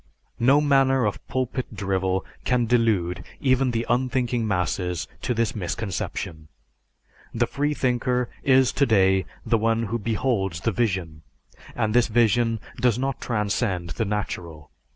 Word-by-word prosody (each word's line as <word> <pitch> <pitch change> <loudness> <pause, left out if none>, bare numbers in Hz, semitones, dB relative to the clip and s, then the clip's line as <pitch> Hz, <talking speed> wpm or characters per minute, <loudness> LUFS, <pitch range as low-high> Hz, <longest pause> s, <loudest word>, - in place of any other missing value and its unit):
No 135 +5 +5
manner 135 -3 +3
of 105 - -2
pulpit 130 -2 -3
drivel 95 -1 -1 0.2
can 125 -2 +1
delude 110 -7 +1 0.2
even 130 -1 +2
the 115 -1 -1
unthinking 125 -2 0
masses 90 -2 -1
to 125 - -1
this 115 0 0
misconception. 90 -5 -4 0.9
The 120 +1 +2
freethinker 125 -3 0 0.2
is 130 -1 +4
today 95 - +3 0.2
the 115 - +2
one 115 +1 +1
who 115 +2 -2
beholds 105 -5 -1
the 115 - +1
vision, 90 -8 -1 0.5
and 110 -3 0
this 120 0 +4
vision 115 0 +2 0.2
does 120 -2 +2
not 135 +1 -2
transcend 105 -6 -1
the 115 - -2
natural. 85 -6 -4
115 Hz, 130 wpm, -24 LUFS, 95-125 Hz, 0.9 s, No